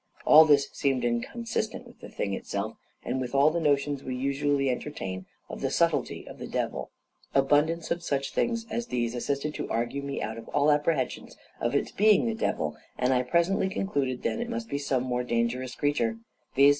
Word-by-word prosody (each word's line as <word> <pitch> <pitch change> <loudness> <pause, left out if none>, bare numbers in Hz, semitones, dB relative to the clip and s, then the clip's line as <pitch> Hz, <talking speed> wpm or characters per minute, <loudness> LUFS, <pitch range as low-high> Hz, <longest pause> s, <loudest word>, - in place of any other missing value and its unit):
All 155 +1 +9
this 140 -2 +4
seemed 135 -3 0
inconsistent 220 - -2
with 240 - -16
the - - -10
thing 100 - -3
itself, 100 +2 -3 0.3
and 130 +2 -1
with 125 +1 -4
all 140 +3 +5
the 170 - 0
notions 145 -2 +1
we 130 - -3
usually 140 +1 +1
entertain 95 -9 -5 0.2
of - - -7
the - - 0
subtlety - - 0
of - - -10
the - - -6
devil. - - -2 0.5
Abundance 150 +5 +2
of 170 +1 0
such 140 -4 -2
things 230 -1 0
as 235 0 -2
these 120 -1 -1
assisted 140 +4 -2
to - - -5
argue 120 +5 -1
me 140 0 -4
out 110 +1 -4
of 115 - -11
all 145 +1 +3
apprehensions 145 -2 0 0.2
of 120 +4 0
its - - 0
being 210 +1 +4
the 230 - 0
devil; 75 - -1 0.2
and 125 +1 +2
I 125 - +3
presently 170 +8 +2
concluded 140 -11 -1
then - - 0
that 240 - -1
it - - -9
must 235 -1 -4
be 140 - -2
some 135 -3 0
more 125 -1 -1
dangerous 120 +1 -1
creature; 120 -6 0 0.4
viz. 140 +1 +7
140 Hz, 195 wpm, -28 LUFS, 125-160 Hz, 0.5 s, All